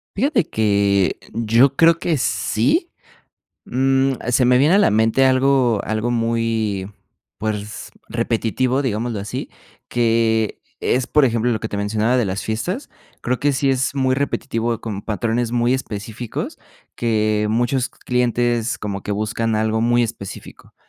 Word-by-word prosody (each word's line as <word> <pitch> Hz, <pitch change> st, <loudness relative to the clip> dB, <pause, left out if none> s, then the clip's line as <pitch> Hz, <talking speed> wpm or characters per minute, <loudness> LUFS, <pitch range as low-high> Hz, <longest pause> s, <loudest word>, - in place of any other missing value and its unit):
Fíjate 240 Hz, -, +1 dB
que 100 Hz, -3 st, +2 dB
yo 115 Hz, +4 st, +3 dB
creo 165 Hz, 0 st, +5 dB
que 170 Hz, -3 st, 0 dB
sí, 130 Hz, -, 0 dB, 0.7 s
mm, 135 Hz, +1 st, +2 dB, 0.2 s
se 125 Hz, +1 st, +3 dB
me 125 Hz, 0 st, +5 dB
viene 150 Hz, +7 st, +4 dB
a -, -, +5 dB
la 205 Hz, -, +4 dB
mente 110 Hz, +5 st, +3 dB
algo 130 Hz, -4 st, +3 dB
algo 110 Hz, +2 st, -1 dB
muy, 115 Hz, -4 st, -1 dB, 0.5 s
pues, 105 Hz, 0 st, -4 dB, 0.2 s
repetitivo, 120 Hz, +3 st, 0 dB
digámoslo 115 Hz, -3 st, -2 dB
así, 100 Hz, -, -5 dB, 0.4 s
que 115 Hz, -2 st, +1 dB, 0.2 s
es, 125 Hz, 0 st, +1 dB
por 150 Hz, -2 st, +3 dB
ejemplo, 120 Hz, 0 st, +1 dB
lo 110 Hz, -, -1 dB
que 110 Hz, -, -4 dB
te 100 Hz, -, -4 dB
mencionaba 110 Hz, +4 st, +1 dB
de 115 Hz, -, +1 dB
las 95 Hz, +1 st, -3 dB
fiestas, 175 Hz, -, -3 dB, 0.3 s
creo 125 Hz, +1 st, -1 dB
que 145 Hz, 0 st, +2 dB
sí 135 Hz, +1 st, +1 dB
es 130 Hz, +1 st, 0 dB
muy 130 Hz, -1 st, +1 dB
repetitivo 120 Hz, -4 st, -1 dB
con 105 Hz, -3 st, -4 dB
patrones 115 Hz, +2 st, -1 dB
muy 120 Hz, +1 st, +1 dB
específicos, 110 Hz, -2 st, -5 dB, 0.4 s
que 110 Hz, -2 st, +1 dB
muchos 120 Hz, +3 st, 0 dB
clientes, 120 Hz, -1 st, 0 dB
como 100 Hz, -2 st, -5 dB
que 105 Hz, -, -3 dB
buscan 110 Hz, +2 st, -1 dB
algo 110 Hz, +1 st, 0 dB
muy 120 Hz, +1 st, +3 dB
específico, 110 Hz, -4 st, -7 dB
115 Hz, 145 wpm, -20 LUFS, 110-130 Hz, 0.7 s, creo